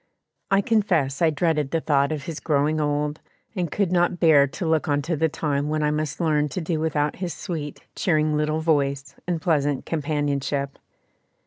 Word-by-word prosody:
I 195 0 +4
confess 180 - +1
I 165 - +5
dreaded 150 -2 0
the 165 - 0
thought 140 -2 +2
of 150 -3 -3
his 160 -1 -5
growing 150 +1 +1
old, 150 +1 -1 0.3
and 175 -4 -1
could 200 -4 0
not 175 0 +2
bear 150 -4 +6
to 155 +6 -5
look 160 -1 +1
on 145 -1 +1
to 165 +2 -1
the 160 +2 +1
time 145 -2 -1
when 155 0 0
I 150 - +2
must 155 -1 -2
learn 150 -3 +1
to 185 - -4
do 160 -1 -2
without 150 -2 0
his 180 -3 -4
sweet, 155 -6 -5
cheering 155 -3 +1
little 155 +1 0
voice 140 -3 0
and 175 -2 0
pleasant 145 -5 0
companionship. 145 -2 -2
155 Hz, 185 wpm, -24 LUFS, 145-165 Hz, 0.3 s, bear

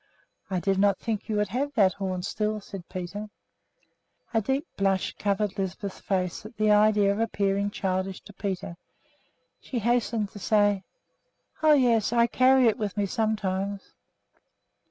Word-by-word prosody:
"I 185 -2 0
did 195 +1 0
not 200 -1 +4
think 220 -2 -4
you 215 - 0
would 210 -1 +1
have 275 +7 -2
that 195 -5 +4
horn 185 -2 -3
still," 215 +2 -1
said 195 -3 -10
Peter. 195 +3 -5 1.0
A 225 - +3
deep 270 - -1
blush 195 -1 0
covered 205 0 -1
Lisbeth's 190 +1 -4
face 185 -2 -2
at 215 +1 -12
the 215 0 +3
idea 210 -1 +4
of 200 - -2
appearing 200 -3 0
childish 190 -1 -2
to 205 - -14
Peter. 190 -3 -4 0.8
She 255 - -5
hastened 230 -2 +1
to 205 - -10
say, 205 -1 +2 0.8
"Oh, 310 -1 +6
yes; 235 -7 +3
I 235 -1 +4
carry 255 +2 +4
it 230 +2 +3
with 210 -2 -3
me 205 - +2
sometimes." 200 -2 -2
205 Hz, 155 wpm, -27 LUFS, 195-220 Hz, 1.0 s, Oh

